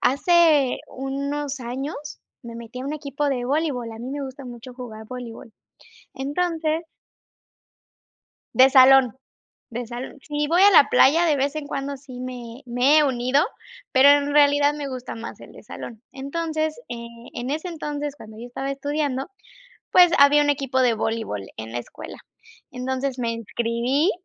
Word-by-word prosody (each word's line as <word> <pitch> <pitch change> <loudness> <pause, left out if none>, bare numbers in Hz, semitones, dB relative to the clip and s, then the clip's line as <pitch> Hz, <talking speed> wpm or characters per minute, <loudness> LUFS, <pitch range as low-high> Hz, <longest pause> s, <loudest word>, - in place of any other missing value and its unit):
Hace 300 -1 +3
unos 275 +1 -4
años 260 +5 -4 0.5
me 235 -1 -9
metí 235 +2 -8
a - - -6
un 280 - -3
equipo 285 -1 -3
de 250 -3 -1
voleibol, 270 -4 -1
a 225 - -10
mí 250 - -6
me 285 +1 -4
gusta 265 +1 -9
mucho 245 +1 -10
jugar 220 -4 -9
voleibol. 235 -2 -9 0.6
Entonces 320 +3 -1 1.7
De 260 +1 +7
salón, 260 -2 +6 0.6
de 240 0 -5
sal 245 +4 -7
si 295 -1 -2
voy 340 +5 +3
a 405 - +8
la 330 -7 +7
playa, 325 +6 +5
de 310 - +3
vez 280 +2 -1
en 305 -2 -4
cuando 280 0 -4
sí 260 -2 -11
me 250 0 -7
me 250 +5 +3
he - - +5
unido, 255 +3 +2 0.5
pero 270 +2 +6
en 285 0 +3
realidad 290 0 +5
me 295 -1 -5
gusta 255 -2 -6
más 230 0 -8
el - - -12
de - - -14
salón. 225 -2 -9
Entonces, 310 +3 -3
eh, 235 -1 -6 0.3
en 245 +3 -4
ese 315 +4 -3
entonces, 295 -3 -4
cuando 215 -6 -13
yo 235 - -7
estaba 270 +3 -4
estudiando, 275 -1 -2 0.6
pues, 355 -2 +6
había 285 +1 +6
un 290 - 0
equipo 270 -2 0
de 245 -3 +3
voleibol 220 - -3 0.2
en 110 +1 -7
la 120 - -2
escuela. 120 - -9 0.5
Entonces, 260 +1 -3
me 230 -1 -1
inscribí 235 - 0
270 Hz, 165 wpm, -23 LUFS, 245-290 Hz, 1.7 s, a